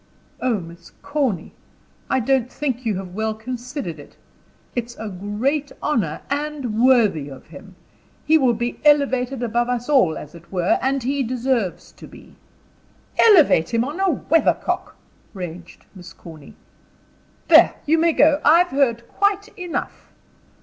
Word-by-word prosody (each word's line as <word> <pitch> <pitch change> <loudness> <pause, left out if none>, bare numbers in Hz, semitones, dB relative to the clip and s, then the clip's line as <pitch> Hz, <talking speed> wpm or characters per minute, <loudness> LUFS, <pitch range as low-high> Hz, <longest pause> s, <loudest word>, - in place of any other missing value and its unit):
"Oh, 245 -5 +1
Miss 170 0 -13
Corny! 280 - -2 0.6
I 260 - +2
don't 255 0 0
think 255 -4 -3
you 210 -4 0
have 185 -2 -7
well 220 +2 -2
considered 245 - -6
it. 145 - -14 0.6
It's 240 -1 -4
a 220 -1 -6
great 215 +10 -2
honor, 190 - -1
and 280 -6 -3
worthy 215 - +3
of 135 - -12
him. 185 +5 -14 0.5
He 315 - +4
will 250 -4 +2
be 240 +2 -4
elevated 270 -4 +2
above 240 +1 0
us 245 +2 -3
all, 250 - +3
as 150 - -10
it 170 0 -15
were, 180 -2 +1
and 270 -1 0
he 275 +3 -1
deserves 245 -5 -2
to - - -14
be." - - -16 0.8
"Elevate 315 - +5
him 230 - +2
on 295 +7 -6
a 385 0 +2
weathercock!" 325 +1 0 0.4
raged 175 -2 -9
Miss 180 -3 -12
Corny. 160 -4 -13 0.9
"There, - - +6
you 320 +2 +3
may 335 0 +3
go. 300 0 +4
I've 340 +4 +5
heard 235 -4 0
quite 405 +1 0
enough." 360 -5 -6
245 Hz, 145 wpm, -21 LUFS, 195-285 Hz, 0.9 s, There